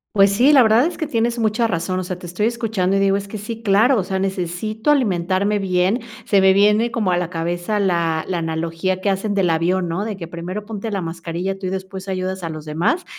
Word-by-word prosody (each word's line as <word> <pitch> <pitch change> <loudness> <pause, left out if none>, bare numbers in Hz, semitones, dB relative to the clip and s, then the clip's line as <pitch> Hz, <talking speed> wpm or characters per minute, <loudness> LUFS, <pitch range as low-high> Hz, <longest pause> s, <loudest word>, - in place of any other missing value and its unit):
Pues 195 -1 +5
sí, 245 +8 +4
la 275 -4 +7
verdad 225 +4 +4
es 350 - -6
que 315 - -2
tienes 235 -4 0
mucha 225 +1 +1
razón, 185 -1 -2
o - - -2
sea, 180 0 -5
te 180 - -11
estoy 180 +5 -1
escuchando 220 -5 -1
y - - +2
digo 195 0 +3
es 200 0 -6
que 215 - -6
sí, 225 +2 -6
claro, 220 +4 +4
o - - 0
sea, 190 +1 -3
necesito 195 - -2
alimentarme 200 -6 +1
bien, 185 +3 +1 0.3
se 200 -2 +3
me 190 0 +6
viene 210 +4 +4
como 220 -5 0
a 175 - +2
la 175 -1 -2
cabeza 175 +4 -2
la 170 -5 0
la 185 - -1
analogía 165 +3 -2
que 200 +1 +1
hacen 200 +2 -2
del 190 -3 +2
avión, 175 +3 +1
¿no? 170 +5 -2
De 215 -3 -4
que 170 -3 -7
primero 175 +5 -6
ponte 220 0 -5
la 200 -3 -2
mascarilla 170 +3 -4
tú 190 - -4
y - - -1
después 190 0 -6
ayudas 190 0 -3
a 165 - -3
los 155 -1 -7
demás. 160 - 0
190 Hz, 240 wpm, -20 LUFS, 175-215 Hz, 0.3 s, la